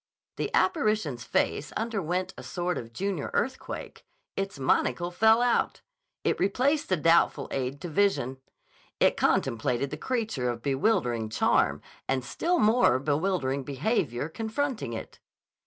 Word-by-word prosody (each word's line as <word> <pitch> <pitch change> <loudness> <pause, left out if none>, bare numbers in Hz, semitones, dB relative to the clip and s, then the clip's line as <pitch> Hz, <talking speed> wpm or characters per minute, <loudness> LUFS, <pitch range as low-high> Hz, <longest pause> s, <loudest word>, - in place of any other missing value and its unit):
The - - -1
apparition's 215 - +1
face 145 - 0
underwent 190 -5 -2
a - - -9
sort 175 -3 -2
of 115 -1 -9
junior 185 +2 -2
earthquake. 260 0 -3 0.3
Its 195 -4 -3
monocle 135 +4 +1
fell 220 +5 +5
out. 245 -1 +1 0.4
It - - +1
replaced 270 +9 +1
the 185 - +2
doubtful 165 -3 +3
aid 135 +1 -2
to - - -4
vision. 160 -7 +1 0.6
It - - +4
contemplated 120 +4 +1
the - - -4
creature 220 - -1
of 115 -1 -4
bewildering 135 - +1
charm 110 - +2 0.2
and 130 -2 0
still 350 - 0
more 220 - +4
bewildering 145 -1 0
behavior 140 - -1
confronting 225 - -3
it. 110 - -7
175 Hz, 130 wpm, -28 LUFS, 130-220 Hz, 0.6 s, fell